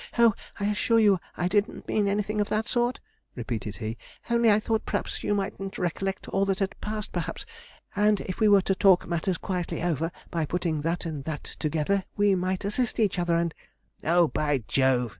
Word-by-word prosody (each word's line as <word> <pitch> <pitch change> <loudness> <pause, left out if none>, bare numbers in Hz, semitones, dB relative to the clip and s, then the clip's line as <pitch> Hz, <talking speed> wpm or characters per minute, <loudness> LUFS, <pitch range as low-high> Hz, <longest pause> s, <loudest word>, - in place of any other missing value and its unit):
'Oh, 235 -2 +6 0.3
I 200 - -1
assure 210 +2 +2
you, 205 -4 +5 0.2
I 175 - +1
didn't 205 +3 0
mean 210 -2 +1
anything 210 +1 0
of 205 - -1
that 215 +2 0
sort,' 240 +1 +1 0.4
repeated 115 -3 -4
he, 110 0 -5 0.3
'only 235 -1 +4
I 210 0 +5
thought 220 0 -1
p'raps - - -3
you 205 - +1
mightn't 195 0 -3
recollect 190 +2 -2
all 195 - +1
that 195 -1 0
had 195 -1 -1
passed, 215 0 -4
p'raps; - - -4 0.5
and 210 0 +3
if 185 - -5
we 220 - +4
were 200 -2 +6
to 195 - +1
talk 190 -1 +4
matters 170 +1 -1
quietly 180 -2 -3
over, 165 -1 0 0.2
by 165 -2 0
putting 165 -1 -1
that 165 +3 -1
and 155 -4 -4
that 155 -3 -4 0.2
together, 160 +6 0
we 205 -1 +4
might 185 +1 -1
assist 230 +4 0
each 200 -4 +2
other 175 -1 +1
and 170 -1 0 0.3
' - - -32
'Oh, 170 +1 +4
by 145 -5 0
Jove!' 130 -3 +2
190 Hz, 195 wpm, -27 LUFS, 165-210 Hz, 0.5 s, Oh